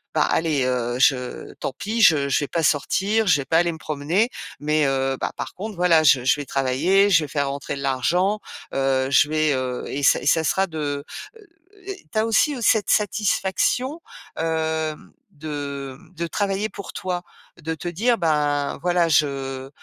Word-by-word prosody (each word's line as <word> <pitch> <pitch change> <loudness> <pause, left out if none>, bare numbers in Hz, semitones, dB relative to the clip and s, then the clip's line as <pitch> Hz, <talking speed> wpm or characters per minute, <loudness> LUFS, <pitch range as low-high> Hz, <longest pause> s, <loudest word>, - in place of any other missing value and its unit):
ben, - - +3
allez, 155 -5 +1
heu, 125 -1 -1
je 125 -2 +1
tant 135 - -3
pis, 225 +3 -2
je 150 -7 +5
je 140 - +1
vais - - -3
pas 165 -1 -1
sortir, 195 +9 +1
je 155 -5 +5
vais - - -7
pas 165 - +2
aller 170 0 +1
me 160 - -8
promener. 155 - 0 0.3
Mais 150 0 +1
heu, 135 0 0
bah, - - -1
par - - -5
contre, 210 +2 -7
voilà, 170 -3 +4
je 130 -4 +5
je 130 - +3
vais 145 - -5
travailler, 150 +11 +2
je 160 -4 +4
vais - - -9
faire 140 -1 -1
rentrer 140 0 -4
de - - -7
l'argent, 175 - +1 0.3
heu, 135 -1 +1
je 145 +2 +4
vais, 155 -1 +1
heu, 130 -1 -3
et 145 - -4
ça - - +5
et - - -8
ça 160 +2 +3
sera 190 +6 +1
de», 145 -3 -4 0.3
heu, 390 +1 -12 0.2
tu 220 - -4
as 220 - +2
aussi 230 +6 +2
cette 215 -1 +3
satisfaction, 215 - 0 0.4
hem, 160 -1 -2 0.2
de, 145 -3 -6
mmh, 180 0 -21
de 170 +1 -3
travailler 200 +3 -1
pour 200 - -9
toi. 180 -2 -3 0.4
De 160 +1 -3
te 170 +3 -7
dire: 230 +8 +1
«Ben, 150 -4 0
voilà, 175 -1 +2
je 135 -3 0
155 Hz, 190 wpm, -22 LUFS, 140-190 Hz, 0.4 s, je